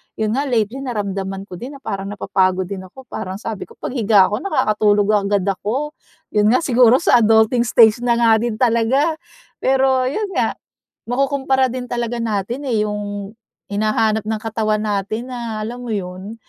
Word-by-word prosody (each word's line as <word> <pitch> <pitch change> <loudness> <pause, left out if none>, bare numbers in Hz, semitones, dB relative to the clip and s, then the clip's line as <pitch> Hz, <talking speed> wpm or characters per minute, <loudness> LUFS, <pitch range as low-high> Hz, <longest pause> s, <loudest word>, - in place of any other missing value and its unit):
yun 215 -1 -1
nga 275 +5 -1
lately 235 0 0
naramdaman 195 -6 -4
ko 180 -3 -10
din 265 +4 -7
na 275 - -14
parang 195 0 -4
napapagod 190 -2 0
din 195 - -4
ako, 265 +8 -14
parang 185 0 -5
sabi 210 0 -6
ko - - -17
paghiga 210 -6 +2
ko 210 - -1
nakakatulog 215 - +2 0.2
agad 200 -2 +1
ako, 215 +10 -2 0.4
yun 210 0 +3
nga 250 +8 +3
siguro 245 -3 +5
sa 260 -4 +4
adulting 225 +2 +3
stage 220 -1 +5
na 240 -1 +1
nga 230 -2 +4
din 235 -1 -2
talaga. 255 +7 +2 0.4
Pero 265 -1 +2
yun 405 +10 -2
nga - - 0 0.6
makukumpara 265 0 +1
din 250 0 -5
talaga 240 0 -3
natin 230 +4 -3
eh, 225 -5 +1
yung 205 -1 -4 0.4
hinahanap 215 +1 +1
ng 220 0 -2
katawan 215 -1 -1
natin 215 +3 -2
na 230 -3 -4
alam 245 +3 -6
mo 230 - -3
yun 190 +2 -5
225 Hz, 165 wpm, -19 LUFS, 205-250 Hz, 0.6 s, siguro